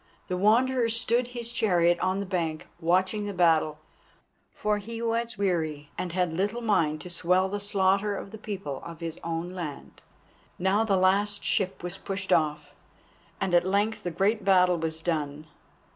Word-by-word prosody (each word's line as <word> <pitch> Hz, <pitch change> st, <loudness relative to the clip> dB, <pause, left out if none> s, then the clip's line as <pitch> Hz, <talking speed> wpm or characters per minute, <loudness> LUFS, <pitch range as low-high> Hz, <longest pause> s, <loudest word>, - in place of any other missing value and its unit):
The 180 Hz, -, 0 dB
Wanderer 235 Hz, +5 st, +3 dB
stood 235 Hz, +1 st, +1 dB
his 240 Hz, -1 st, -3 dB
chariot 175 Hz, -7 st, +3 dB
on 185 Hz, +1 st, 0 dB
the 200 Hz, -, -3 dB
bank, 170 Hz, -5 st, -2 dB
watching 185 Hz, +5 st, +1 dB
the 200 Hz, -, -5 dB
battle, 160 Hz, -3 st, +3 dB, 0.7 s
for 210 Hz, 0 st, -1 dB
he 225 Hz, +3 st, -7 dB
was 230 Hz, -1 st, -1 dB
weary, 160 Hz, -7 st, -1 dB
and 180 Hz, -, -3 dB
had 180 Hz, -1 st, 0 dB
little 205 Hz, +7 st, -1 dB
mind 160 Hz, -9 st, +1 dB
to 180 Hz, -, -8 dB
swell 180 Hz, +2 st, +2 dB
the 205 Hz, +2 st, -3 dB
slaughter 200 Hz, 0 st, +1 dB
of 195 Hz, -, -7 dB
the 220 Hz, -, -9 dB
people 195 Hz, -10 st, -5 dB
of 165 Hz, -1 st, -9 dB
his 165 Hz, -1 st, -5 dB
own 170 Hz, +1 st, -3 dB
land. 165 Hz, -6 st, -7 dB, 0.6 s
Now 190 Hz, +4 st, +2 dB
the 200 Hz, -4 st, +2 dB
last 200 Hz, +2 st, +2 dB
ship 190 Hz, -2 st, 0 dB
was 180 Hz, +2 st, -4 dB
pushed 195 Hz, 0 st, -2 dB
off, 150 Hz, -1 st, 0 dB, 0.7 s
and 190 Hz, -2 st, -1 dB
at 175 Hz, 0 st, +5 dB
length 200 Hz, +4 st, 0 dB
the 175 Hz, -, -3 dB
great 200 Hz, +5 st, +1 dB
battle 180 Hz, -2 st, +4 dB
was 160 Hz, 0 st, -3 dB
done. 150 Hz, -3 st, -2 dB
190 Hz, 170 wpm, -27 LUFS, 170-205 Hz, 0.7 s, at